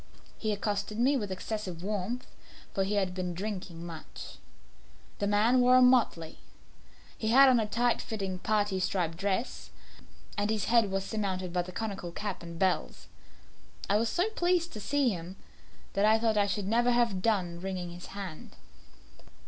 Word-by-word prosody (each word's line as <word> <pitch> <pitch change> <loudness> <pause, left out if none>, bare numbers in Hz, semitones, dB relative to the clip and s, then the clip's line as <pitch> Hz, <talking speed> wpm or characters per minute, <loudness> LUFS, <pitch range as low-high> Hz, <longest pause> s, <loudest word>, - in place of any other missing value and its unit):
He 215 - -1
accosted 205 0 -2
me 260 +5 +3
with 205 -7 -2
excessive 185 -2 -4
warmth, 210 +5 -2 0.5
for 195 - +1
he 200 +2 -1
had 190 -3 +1
been 180 -1 -3
drinking 185 -3 -5
much. 165 -2 -9 0.8
The 205 - 0
man 220 +5 +4
wore 250 +1 +6
motley. 245 -11 +3 0.8
He 220 - -4
had 270 +5 +7
on 250 -2 +5
a 215 - 0
tight 240 +2 +1
fitting 195 -4 -4
parti 205 -2 +1
striped 180 -3 0
dress, 200 +7 -2 0.7
and 205 +1 0
his 215 -3 0
head 230 -3 +4
was 195 0 -1
surmounted 190 -5 -2
by 180 - +2
the 180 +1 -8
conical 195 -4 -4
cap 200 +2 -4
and 170 -1 -8
bells. 185 0 -1 0.8
I 205 - +5
was 225 +1 +1
so 355 - +1
pleased 350 -3 +1
to 215 - -6
see 275 +5 +1
him, 180 -2 -5 0.6
that 200 - +1
I 215 +1 +6
thought 225 -1 +1
I 205 -1 +3
should 200 -1 -2
never 240 +3 +3
have 235 -6 +2
done 185 -6 0
wringing 185 -2 -4
his 175 +1 -9
hand. 185 -6 -7
205 Hz, 165 wpm, -30 LUFS, 185-230 Hz, 0.8 s, had